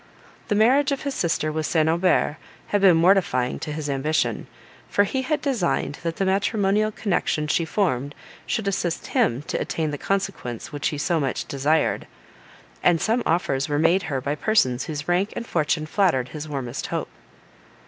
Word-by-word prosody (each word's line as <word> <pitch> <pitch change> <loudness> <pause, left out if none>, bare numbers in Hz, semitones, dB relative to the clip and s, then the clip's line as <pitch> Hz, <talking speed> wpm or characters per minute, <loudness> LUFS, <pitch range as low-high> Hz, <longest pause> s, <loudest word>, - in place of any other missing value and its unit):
The 205 - +1
marriage 265 +7 +4
of 275 - -2
his 280 - -2
sister 165 -7 0
with 155 0 -2
St. 160 -2 +2
Aubert 170 -2 +2 0.3
had 205 - +1
been 185 -4 +6
mortifying 165 -8 +2
to 150 - -5
his 150 0 -4
ambition, 145 +3 -1 0.4
for 200 - +3
he 260 +6 -1
had 295 +3 -1
designed 190 - -1
that 165 -1 -3
the 195 - -1
matrimonial 200 +2 +1
connection 175 -7 -1
she 160 +2 +1
formed 145 - -1 0.3
should 220 -3 -1
assist 180 -4 -1
him 120 +4 +2
to - - -3
attain 155 -2 -2
the 145 - -5
consequence 195 - -3
which 145 -1 -2
he 150 - -2
so 165 +3 +1
much 135 -3 -2
desired; 145 +3 0 0.7
and 175 -2 +4
some 230 +7 +1
offers 140 -5 0
were 145 - 0
made 165 +5 +3
her 135 -3 -1
by 140 +3 -2
persons 145 - +1
whose 150 -2 -5
rank 180 +4 +1
and 235 - -4
fortune 155 -4 0
flattered 155 -8 +1
his 155 +1 -7
warmest 135 -5 -4
hope. - - -3
165 Hz, 175 wpm, -24 LUFS, 145-200 Hz, 0.7 s, been